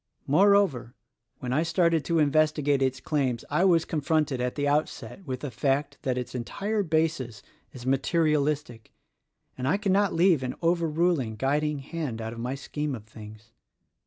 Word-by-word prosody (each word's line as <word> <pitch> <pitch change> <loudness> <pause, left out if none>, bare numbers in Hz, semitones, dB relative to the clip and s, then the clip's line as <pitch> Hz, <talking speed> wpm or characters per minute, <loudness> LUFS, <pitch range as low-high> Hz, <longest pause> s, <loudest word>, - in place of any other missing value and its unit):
Moreover, 185 - +3 0.5
when 125 -1 -2
I 150 - +2
started 165 -1 +2
to 170 - 0
inves 155 0 +4
tigate 145 -2 0
its 130 0 0
claims 130 -6 -1
I 155 +5 +2
was 170 -3 +4
confronted 150 -4 0
at 125 0 -2
the 145 -1 -1
outset 145 - -2
with 130 -1 -4
the 145 - -5
fact 140 +4 -1
that 130 -1 -1
its 125 - -4
entire 200 - -2
basis 155 - -1 0.3
is 125 -2 -10
materialistic, 145 -2 0 0.6
and 130 0 -3
I 195 - +3
cannot 200 -1 +1
leave 170 -3 +4
an 130 -1 -3
overruling, 165 -7 +1
guiding 145 +5 0
hand 140 -4 -5
out 110 0 -5
of 115 - -9
my 125 +3 -3
scheme 145 +1 -4
of 110 -3 -10
things. 110 0 -13
145 Hz, 160 wpm, -27 LUFS, 125-165 Hz, 0.6 s, inves